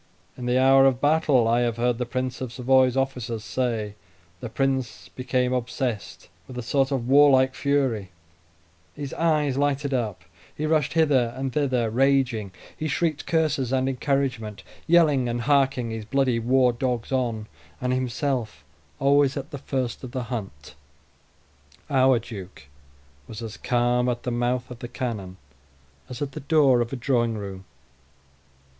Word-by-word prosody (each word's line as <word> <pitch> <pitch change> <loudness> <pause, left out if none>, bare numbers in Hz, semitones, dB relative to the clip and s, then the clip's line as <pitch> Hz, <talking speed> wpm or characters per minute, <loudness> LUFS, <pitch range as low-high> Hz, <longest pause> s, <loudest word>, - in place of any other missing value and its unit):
In 125 -1 -6
the 125 +1 +2
hour 135 +1 +6
of 130 -2 +1
battle 145 -5 +3
I 115 +1 +3
have 120 -1 0
heard 120 0 0
the 125 - -2
Prince 130 +1 -3
of 130 -3 -4
Savoy's 130 +1 +3
officers 125 -4 -2
say, 115 -4 -2 0.5
the 120 - -6
Prince 130 -1 -2
became 125 -1 -1
possessed 120 -2 -4 0.2
with 130 - -9
a 125 - -4
sort 135 +2 +1
of 125 -4 -1
warlike 135 -1 +5
fury; 135 -9 0 0.9
his 145 -2 -6
eyes 150 -5 +1
lighted 140 0 0
up; 110 -9 -2 0.3
he 155 - -2
rushed 155 -2 +1
hither 140 -7 +3
and 135 -1 -3
thither, 130 -6 0
raging; 130 -5 +1 0.2
he 155 - -3
shrieked 155 +1 -1
curses 155 -6 +1
and 130 0 +1
encouragement, 125 -6 -2 0.2
yelling 150 -7 +4
and 120 0 -2
harking 135 -3 +1
his 110 -1 -5
bloody 130 0 +1
war 125 +1 +3
dogs 120 -1 -2
on, 120 -5 -1 0.3
and 125 0 -1
himself 125 - -2 0.3
always 140 0 +3
at 140 +2 -6
the 140 - -6
first 130 -3 -3
of 125 -1 -8
the 130 -2 -2
hunt. 95 -11 -7 1.2
Our 130 -2 +4
duke 100 - -9 0.6
was 110 +1 -8
as 110 -2 -6
calm 125 0 +1
at 120 -1 -3
the 125 - -2
mouth 120 +1 -1
of 120 - -9
the 120 - -6
cannon 110 -7 -5 0.7
as 125 +2 -4
at 140 - -4
the - - -7
door 140 -4 +3
of 120 - -3
a - - -3
drawing 120 -3 0
room. 95 -2 -7
130 Hz, 155 wpm, -25 LUFS, 120-135 Hz, 1.2 s, hour